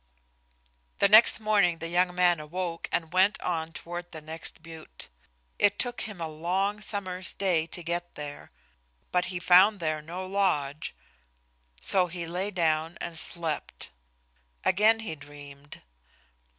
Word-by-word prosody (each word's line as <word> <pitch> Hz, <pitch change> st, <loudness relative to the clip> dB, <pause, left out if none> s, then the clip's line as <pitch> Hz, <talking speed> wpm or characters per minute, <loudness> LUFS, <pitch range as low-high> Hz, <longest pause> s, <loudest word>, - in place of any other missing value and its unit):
The -, -, +5 dB
next 215 Hz, +3 st, +7 dB
morning 205 Hz, -6 st, +2 dB
the 165 Hz, -, -5 dB
young 180 Hz, +1 st, +1 dB
man 175 Hz, -2 st, +3 dB
awoke 170 Hz, +2 st, -5 dB
and 165 Hz, 0 st, -2 dB
went 190 Hz, +3 st, +3 dB
on 165 Hz, -2 st, -3 dB
toward 175 Hz, +1 st, -8 dB
the 160 Hz, -, -7 dB
next 160 Hz, +1 st, -5 dB
butte. 160 Hz, -1 st, -10 dB, 0.5 s
It 205 Hz, 0 st, +3 dB
took 245 Hz, -1 st, -1 dB
him 200 Hz, -4 st, -9 dB
a 165 Hz, -, -3 dB
long 185 Hz, +7 st, -2 dB
summer's 190 Hz, -3 st, -2 dB
day 175 Hz, -5 st, +1 dB
to 175 Hz, 0 st, -7 dB
get 175 Hz, +1 st, -4 dB
there, 145 Hz, -1 st, -8 dB, 0.6 s
but 180 Hz, 0 st, +1 dB
he 180 Hz, -, -4 dB
found 190 Hz, +4 st, +6 dB
there 155 Hz, -2 st, -2 dB
no 175 Hz, +4 st, -7 dB
lodge, 160 Hz, -, -1 dB, 0.8 s
so 185 Hz, -, +4 dB
he 170 Hz, 0 st, -6 dB
lay 180 Hz, +4 st, -3 dB
down 165 Hz, -3 st, 0 dB
and 170 Hz, -, -6 dB
slept. 165 Hz, -3 st, -2 dB, 0.7 s
Again 215 Hz, +4 st, +4 dB
he 215 Hz, -8 st, -5 dB
dreamed. 145 Hz, -1 st, -13 dB
175 Hz, 140 wpm, -27 LUFS, 160-190 Hz, 0.8 s, next